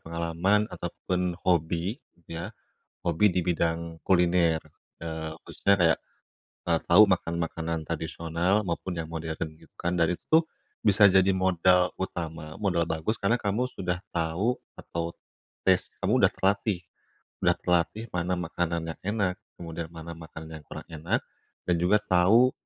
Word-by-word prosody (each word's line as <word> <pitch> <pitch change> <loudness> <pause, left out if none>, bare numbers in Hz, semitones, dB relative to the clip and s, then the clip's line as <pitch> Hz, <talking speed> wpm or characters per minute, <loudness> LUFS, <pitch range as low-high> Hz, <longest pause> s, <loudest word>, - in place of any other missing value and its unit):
pengalaman 85 +5 +1
ataupun 90 -1 -2
hobi 85 - +1 0.3
ya, 85 +4 -5 0.5
hobi 90 +4 +3
di - - +2
bidang 85 -1 -1
kuliner, 85 -3 +4 0.4
eee, 80 -1 -4
khususnya 100 - +1
kayak, 80 -2 +4 0.7
eee, 85 -2 +2
tahu 95 +5 +9
makan-makanan 85 -3 -1
tradisional 85 +4 0
maupun 90 +1 -3
yang 80 - -2
modern 80 -1 -3
gitu - - -20
kan. 85 +1 -1
Dan 85 +1 +3
itu - - -46
tuh 160 +1 +7 0.4
bisa 105 -1 +6
jadi 95 0 +5
modal 90 -1 +3
utama, 80 -4 -5
modal 90 -5 +1
bagus, 80 +8 -1
karena 115 +5 +3
kamu 110 +5 0
sudah 90 -1 -2 0.2
tahu, 85 +9 +1 0.2
atau 85 0 -4 0.5
taste - - +3
kamu - - +3
udah - - +6
terlatih. 100 -1 +1 0.6
Udah - - +4
terlatih 90 +6 0
mana 90 +1 0
makanan 85 -1 -2
yang - - -41 0.2
enak, 95 -3 +1 0.2
kemudian 85 -1 -5
mana 85 0 -8
makanan 80 -1 -9
yang - - -18
kurang - - -8
enak, 80 +1 -1 0.5
dan 90 - +3
juga 95 +5 +4
tahu 105 +6 +5
85 Hz, 140 wpm, -27 LUFS, 80-95 Hz, 0.7 s, tahu